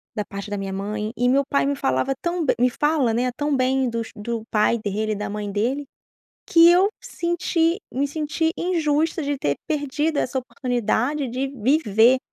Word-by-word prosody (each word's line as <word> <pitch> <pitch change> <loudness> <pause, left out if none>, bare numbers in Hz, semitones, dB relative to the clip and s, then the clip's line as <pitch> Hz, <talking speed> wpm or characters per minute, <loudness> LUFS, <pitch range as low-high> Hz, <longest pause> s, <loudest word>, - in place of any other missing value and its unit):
da 210 - -1
parte 200 +1 -8
da 205 - -2
minha 195 -1 -4
mãe 210 +2 -3
e 245 - +2
meu 265 +3 +4
pai 280 - +2
me 285 - 0
falava 130 - 0
tão 345 -2 -1
be - - +3
me 250 - +4
fala, 295 -2 +1
né, 245 +2 0
tão 290 -2 0
bem 260 0 +1
dos 230 -1 -4
do 225 +1 -4
pai 215 +2 +3
dele 215 0 -2
e - - -3
da 205 0 -4
mãe 205 -1 -4
dele, 250 +8 -1 0.6
que 335 0 +7
eu 365 +3 +5
senti 340 0 0
me 280 +3 0
senti 310 +2 -1
injusta 325 -2 0
de 285 -1 -2
ter 145 - 0
perdido 295 +1 -1
essa 260 +1 0
oportunidade 250 +2 -1
de 255 +3 -2
viver, 255 -2 +3
260 Hz, 185 wpm, -23 LUFS, 220-300 Hz, 0.6 s, que